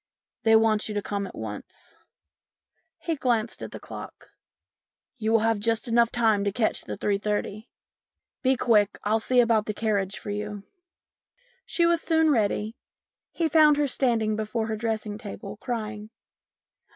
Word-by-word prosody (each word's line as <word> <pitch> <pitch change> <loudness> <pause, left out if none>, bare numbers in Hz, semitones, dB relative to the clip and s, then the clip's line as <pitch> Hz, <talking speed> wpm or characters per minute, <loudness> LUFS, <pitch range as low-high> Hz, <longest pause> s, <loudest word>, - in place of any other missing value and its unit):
They 225 0 +5
want 220 -1 +3
you 210 - -4
to 205 - 0
come 200 -1 -3
at - - -11
once." - - -8 1.0
He 330 - -2
glanced 235 -5 -1
at - - -6
the - - -8
clock. - - -10 0.4
" - - -65
You 220 0 0
will 225 0 +4
just 225 +2 -1
have 235 -1 +3
time 220 -4 +2
to 200 - 0
catch 215 +1 -1
the - - -5
3.30. 210 +2 -2 0.7
Be 260 -1 +2
quick, 210 -4 +3
I'll 215 +2 +2
see 250 +3 +2
about 230 -3 +3
the 215 - -3
carriage 200 -3 -1
for 205 - -6
you." 205 -1 -5 1.0
She 340 - +2
was 335 -1 +3
soon 320 -2 +3
ready. 215 -2 0 0.6
He 335 - 0
found 305 -1 +5
her 295 - +2
standing 230 -5 +1
before 220 +1 -2
her 220 - -1
dressing 220 -1 -3
table, 210 -2 -8
crying. 215 -2 -5
220 Hz, 155 wpm, -26 LUFS, 210-240 Hz, 1.0 s, They